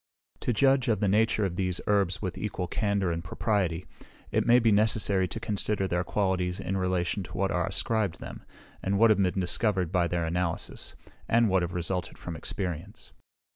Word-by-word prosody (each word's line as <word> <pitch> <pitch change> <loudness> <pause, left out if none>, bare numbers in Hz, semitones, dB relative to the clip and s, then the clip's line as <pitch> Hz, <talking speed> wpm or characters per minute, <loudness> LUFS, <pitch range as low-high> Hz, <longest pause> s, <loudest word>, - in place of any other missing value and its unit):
To - - -1
judge 135 +2 +3
of 110 -4 +2
the 105 - +1
nature 110 +1 +2
of 90 -2 -3
these 90 -2 -1
herbs 100 -2 +1
with 90 -2 -3
equal 100 -3 -3
candour 100 0 0
and 85 0 -3
propriety, 90 -2 -1 0.5
it - - +1
may 120 - +7
be 115 -2 +3
necessary 105 -3 +2
to 110 - -5
consider 105 -2 -1
their 90 -1 0
qualities 95 -3 -1
in 95 - -3
relation 90 0 0
to 95 - -8
what - - +1
are - - 0
ascribed 105 -6 -1
them, - - -9 0.4
and 100 +1 0
what 115 +1 +6
have 100 -2 +3
been 95 0 +1
discovered 95 -1 0
by 90 -2 +2
their 85 -1 -1
analysis, 85 0 -2 0.3
and 115 -1 +4
what 95 -1 +3
have 85 0 -3
resulted 90 0 -2
from 85 - -6
experience. 90 +2 -5
95 Hz, 185 wpm, -28 LUFS, 90-105 Hz, 0.5 s, may